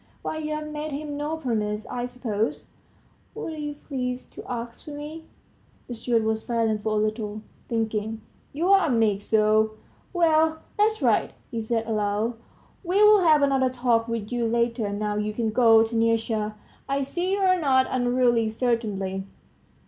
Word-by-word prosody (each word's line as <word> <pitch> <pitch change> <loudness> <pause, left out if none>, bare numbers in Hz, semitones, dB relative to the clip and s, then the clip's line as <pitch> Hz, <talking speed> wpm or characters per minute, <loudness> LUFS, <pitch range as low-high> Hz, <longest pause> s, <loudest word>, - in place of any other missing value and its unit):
why, - - -3
you've 305 0 -3
made 300 +1 -4
him 290 +1 -4
no 295 +2 -2
promise, 215 -7 -2
I 245 0 -3
suppose.. 235 -3 -2 0.3
." - - -35
"What 325 - -5
are - - -8
you 295 -1 -4
pleased 255 -3 -5
to - - -9
ask 235 +1 -6
of 295 - -6
me?" 305 +2 -8 0.6
The 245 - -5
steward 230 0 0
was 220 0 -1
silent 225 -3 0
for 215 0 -1
a 210 - +2
little, 215 -1 -3 0.3
thinking, 220 -1 -2 0.3
"You're 365 +7 +4
a 350 - 0
meek 220 -5 +2
soul! 215 0 +3 0.4
Well, 320 -2 +2
that's 435 +1 +2
right," - - +2 0.2
he 230 -2 -2
said 225 0 -1
aloud; 215 +1 0 0.5
"we'll 415 +4 +6
have 310 -5 +5
another 270 -2 +3
talk 245 -2 +1
with 230 -2 -4
you 240 -1 0
later, 235 -2 0
now 210 0 -2
you 210 0 -1
can 225 -1 0
go, 225 -1 +6
Taniusha; 225 -1 0 0.3
I 275 0 +1
see 350 +7 -1
you're 375 -2 +3
not 260 -4 +3
unruly, 245 -2 +2
certainly." 210 -5 -1
235 Hz, 160 wpm, -25 LUFS, 220-295 Hz, 0.6 s, we'll